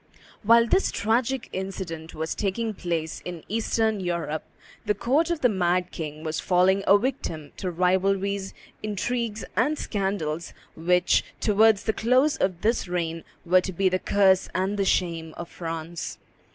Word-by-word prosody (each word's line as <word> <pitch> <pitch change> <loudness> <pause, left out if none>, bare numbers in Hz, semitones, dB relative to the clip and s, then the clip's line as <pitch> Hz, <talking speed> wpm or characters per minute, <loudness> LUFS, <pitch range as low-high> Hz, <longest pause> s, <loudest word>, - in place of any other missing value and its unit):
While 230 +2 +6
this 380 +10 +3
tragic 235 +4 0
incident 185 -4 -5
was 160 +1 -2
taking 215 +3 -2
place 165 -4 -3
in 175 -3 -7
Eastern 220 0 0
Europe, 170 -4 -2 0.4
the 210 -1 0
court 280 - +1
of 340 -3 -1
the 250 - +6
mad 180 -3 +1
king 155 -2 -6
was 155 -1 -2
falling 190 +2 +3
a 200 - +7
victim 165 - -3
to 185 - -3
rivalries, 190 +2 +1 0.3
intrigues, 215 +1 -2
and 295 +6 +2
scandals 190 - -2 0.2
which, 180 +2 +3 0.2
towards 215 0 +4
the 220 - 0
close 255 +7 +3
of 185 -2 -1
this 225 -2 +1
reign, 165 -2 -2 0.2
were 180 +2 +5
to 190 - -4
be 190 +2 +2
the 185 0 0
curse 190 -1 +3
and 190 +2 0
the 200 - +1
shame 165 -4 0
of 170 - -7
France. 165 0 -5
190 Hz, 150 wpm, -25 LUFS, 170-220 Hz, 0.4 s, a